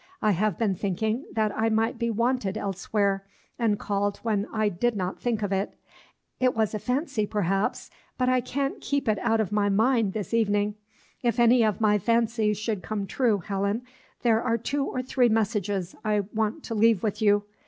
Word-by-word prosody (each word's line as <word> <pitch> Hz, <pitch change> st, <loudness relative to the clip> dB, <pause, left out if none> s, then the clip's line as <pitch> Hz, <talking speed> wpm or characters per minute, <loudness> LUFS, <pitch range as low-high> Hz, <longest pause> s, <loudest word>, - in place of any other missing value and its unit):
I 215 Hz, -, +2 dB
have 200 Hz, -1 st, 0 dB
been 215 Hz, -4 st, +1 dB
thinking 215 Hz, +6 st, -2 dB
that 215 Hz, -2 st, 0 dB
I 225 Hz, +1 st, +1 dB
might 225 Hz, +2 st, 0 dB
be 235 Hz, -1 st, 0 dB
wanted 230 Hz, -3 st, 0 dB
elsewhere, 195 Hz, 0 st, -1 dB, 0.4 s
and 220 Hz, -3 st, +2 dB
called 200 Hz, 0 st, -1 dB
when 215 Hz, -2 st, 0 dB
I 215 Hz, -1 st, +1 dB
did 215 Hz, +5 st, 0 dB
not 185 Hz, -2 st, -3 dB
think 230 Hz, -3 st, -1 dB
of 200 Hz, -, -1 dB
it; 195 Hz, +1 st, -1 dB, 0.6 s
it 255 Hz, -1 st, +2 dB
was 220 Hz, -1 st, +1 dB
a 215 Hz, -, -2 dB
fancy, 250 Hz, -, -1 dB
perhaps, 195 Hz, -1 st, -1 dB, 0.3 s
but 255 Hz, -, +1 dB
I 255 Hz, 0 st, +3 dB
can't 275 Hz, +3 st, -3 dB
keep 280 Hz, -2 st, -1 dB
it 215 Hz, -2 st, +2 dB
out 225 Hz, -2 st, +1 dB
of 215 Hz, -2 st, 0 dB
my 205 Hz, -1 st, +2 dB
mind 220 Hz, 0 st, +2 dB
this 210 Hz, -1 st, -4 dB
evening. 205 Hz, -2 st, +2 dB, 0.5 s
If 240 Hz, 0 st, 0 dB
any 235 Hz, 0 st, +5 dB
of 215 Hz, -4 st, +1 dB
my 210 Hz, -2 st, +3 dB
fancies 225 Hz, -1 st, +1 dB
should 210 Hz, -2 st, -2 dB
come 205 Hz, 0 st, -3 dB
true, 210 Hz, -2 st, +1 dB
Helen, 200 Hz, +3 st, -1 dB, 0.4 s
there 225 Hz, -2 st, +3 dB
are 230 Hz, -2 st, +1 dB
two 275 Hz, +5 st, -1 dB
or 255 Hz, -2 st, -3 dB
three 250 Hz, -1 st, +2 dB
messages 205 Hz, -4 st, -1 dB
I 210 Hz, -1 st, +2 dB
want 220 Hz, +6 st, -1 dB
to 230 Hz, -, -5 dB
leave 220 Hz, -2 st, +3 dB
with 215 Hz, 0 st, -2 dB
you. 205 Hz, -1 st, +4 dB
215 Hz, 190 wpm, -26 LUFS, 205-235 Hz, 0.6 s, any